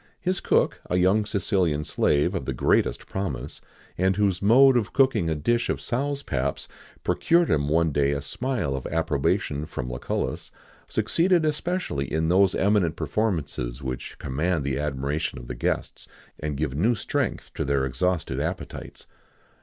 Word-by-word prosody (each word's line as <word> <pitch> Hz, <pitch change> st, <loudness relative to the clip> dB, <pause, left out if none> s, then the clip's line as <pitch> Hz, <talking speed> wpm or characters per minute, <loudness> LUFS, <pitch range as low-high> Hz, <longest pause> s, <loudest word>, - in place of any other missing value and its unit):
His 185 Hz, +1 st, -1 dB
cook, -, -, +1 dB
a -, -, 0 dB
young 95 Hz, +4 st, +3 dB
Sicilian 90 Hz, -6 st, +1 dB
slave 75 Hz, 0 st, +1 dB
of -, -, -3 dB
the -, -, -3 dB
greatest -, -, +1 dB
promise, 95 Hz, -9 st, -4 dB, 0.4 s
and 95 Hz, +1 st, +3 dB
whose 100 Hz, -3 st, +1 dB
mode 130 Hz, +6 st, +6 dB
of 115 Hz, -4 st, 0 dB
cooking 130 Hz, -, +3 dB
a 80 Hz, -, 0 dB
dish 120 Hz, +11 st, 0 dB
of -, -, 0 dB
sows' 140 Hz, +3 st, -2 dB
paps 70 Hz, +1 st, -2 dB, 0.4 s
procured 170 Hz, 0 st, +2 dB
him 70 Hz, -1 st, +1 dB
one 80 Hz, +1 st, +2 dB
day 70 Hz, -1 st, +2 dB
a 70 Hz, 0 st, -1 dB
smile 105 Hz, -, -2 dB
of 65 Hz, -, -4 dB
approbation 75 Hz, -1 st, 0 dB
from 60 Hz, -4 st, -5 dB
Lucullus, 60 Hz, -, -3 dB, 0.4 s
succeeded 170 Hz, -1 st, +2 dB
especially 155 Hz, -, -2 dB
in 80 Hz, +1 st, +1 dB
those 95 Hz, +1 st, +4 dB
eminent 100 Hz, -5 st, +2 dB
performances 70 Hz, -, -2 dB
which 65 Hz, -1 st, -5 dB
command 75 Hz, +4 st, -1 dB
the 70 Hz, 0 st, -1 dB
admiration 70 Hz, 0 st, -2 dB
of -, -, -8 dB
the 60 Hz, -, -5 dB
guests, -, -, -3 dB, 0.3 s
and 75 Hz, -2 st, -3 dB
give 75 Hz, -3 st, -1 dB
new 105 Hz, -, +2 dB
strength -, -, -2 dB
to -, -, -2 dB
their 70 Hz, -1 st, +1 dB
exhausted 85 Hz, +7 st, -1 dB
appetites. -, -, -5 dB
80 Hz, 155 wpm, -25 LUFS, 70-110 Hz, 0.4 s, mode